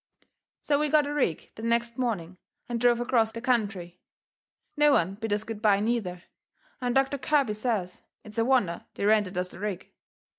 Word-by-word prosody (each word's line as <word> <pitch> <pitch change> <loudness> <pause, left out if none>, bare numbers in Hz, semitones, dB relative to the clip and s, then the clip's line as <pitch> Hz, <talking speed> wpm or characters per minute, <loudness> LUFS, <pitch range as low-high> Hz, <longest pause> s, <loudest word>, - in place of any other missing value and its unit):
So 285 -1 +2
we 300 0 +1
got 300 0 +4
a 290 - -3
rig 255 - -1
the - - -10
next 235 +1 0
morning 190 -8 -2 0.3
and 235 -1 -3
drove 240 -1 +4
acrost 230 -2 +1
the - - -4
country. 200 -8 -1 0.8
No 295 -1 +5
one 185 -5 +2
bid 220 +2 -5
us 210 +1 +1
good 220 -1 -7
bye, 205 -3 +4
neither, 205 -5 -2 0.6
and 245 0 -1
Doctor 270 +1 +2
Kirby 280 -6 +2
says 210 -5 -2 0.2
it's 215 +1 -6
a - - +4
wonder 235 -9 +1
they - - -2
rented 205 -3 +2
us 180 0 -1
the - - -11
rig. 200 -3 -5
225 Hz, 185 wpm, -27 LUFS, 200-250 Hz, 0.8 s, No